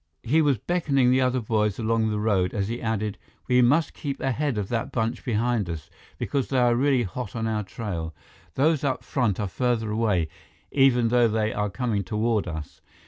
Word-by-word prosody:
He 155 +7 +3
was 145 -5 +3
beckoning 140 - +1
the 130 +1 +3
other 130 0 +1
boys 105 -2 0
along 110 0 +1
the 105 - -1
road 100 -2 +1
as 100 0 -1
he 120 +1 -4
added: 110 -2 -2 0.3
"We 125 0 +4
must 145 +6 +3
keep 140 -2 -5
ahead 135 -1 -1
of 100 -2 -2
that 115 -2 -2
bunch 115 +1 -2
behind 115 -4 0
us, 80 -3 -6 0.3
because 140 -3 -1
they 135 - -1
are 120 -1 +4
really 130 0 +2
hot 115 +3 -6
on 115 -1 -2
our 110 -1 0
trail. 90 -6 -5 0.4
Those 150 +1 +2
up 135 -2 -1
front 120 -8 0
are 105 - -1
farther 115 +1 -1
away, 105 -7 +1 0.4
even 125 -4 +4
though 120 0 +4
they 110 0 0
are 105 0 -1
coming 105 -1 -1
toward 110 0 0
us. 80 -3 -7
115 Hz, 195 wpm, -25 LUFS, 105-130 Hz, 0.4 s, We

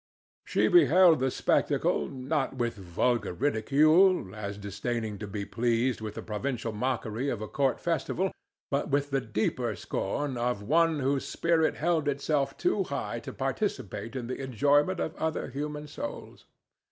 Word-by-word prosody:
She - - +2
beheld 185 - +6
the 130 +1 +1
spectacle - - +1
not 135 +2 -2
with 120 -2 -1
vulgar 100 +5 -1
ridicule, 145 - +3
as 100 -2 -5
disdaining 105 +1 -3
to 105 - -5
be 100 0 -4
pleased 120 +2 0
with 110 -1 -5
the - - -6
provincial 115 +1 -3
mockery 120 +2 -2
of 120 - -2
a 110 - -5
court 135 +3 0
festival, 170 +3 -1 0.4
but 140 +1 0
with 140 0 0
the 135 -1 +1
deeper 110 +1 -1
scorn 130 +9 -3
of 120 -3 -1
one 160 +4 +3
whose 135 +1 0
spirit 165 -1 +1
held 160 -1 0
itself 140 -1 0
too - - +1
high - - -3
to - - -7
participate 115 +5 -3
in 125 -2 -3
the 130 +3 -5
enjoyment 145 - +2
of 160 - -2
other 160 -3 -2
human 150 +2 -4
souls. 285 - -7
130 Hz, 155 wpm, -29 LUFS, 110-150 Hz, 0.4 s, beheld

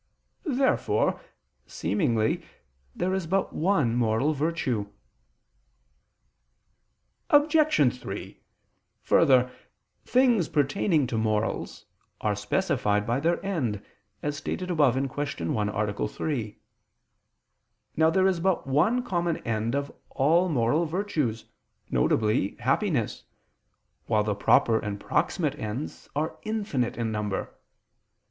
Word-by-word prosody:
Therefore, 265 -1 +1 0.5
seemingly, 115 - 0 0.5
there 185 +1 -1
is 190 -3 -2
but 190 +3 0
one 155 -9 +1
moral 120 +5 +2
virtue. 140 -8 -1 2.4
Obj. 290 - +4
3: - - -7 0.6
Further, 130 -5 +4 0.5
things 245 -8 +3
pertaining 145 +2 +1
to 120 -2 -2
morals 110 0 -2 0.3
are 105 -1 0
specified 105 - 0
by 120 +4 0
their 170 +5 0
end, 130 - -1 0.4
as 145 0 -1
stated 180 +4 -4
above 145 -7 +3
(Q. 135 - -2
1, 105 -1 0
A. 105 0 -1
3). 115 -3 -4 1.4
Now 160 +1 +4
there 185 +3 +2
is 190 -3 +2
but 185 +1 0
one 185 - +2
common 175 -6 -1
end 115 +2 -1
of 140 0 -2 0.2
all 165 +7 +2
moral 145 +3 +2
virtues, 155 - -2 0.5
viz. 100 - +1
happiness, 135 - 0 0.8
while 110 -2 +2
the 105 0 0
proper 110 +2 +3
and 105 -1 -4
proximate 150 - -1
ends 110 +7 -5
are 155 +3 -2
infinite 205 - -2
in 115 -2 -1
number. 105 -2 -3
140 Hz, 105 wpm, -27 LUFS, 110-175 Hz, 2.4 s, Obj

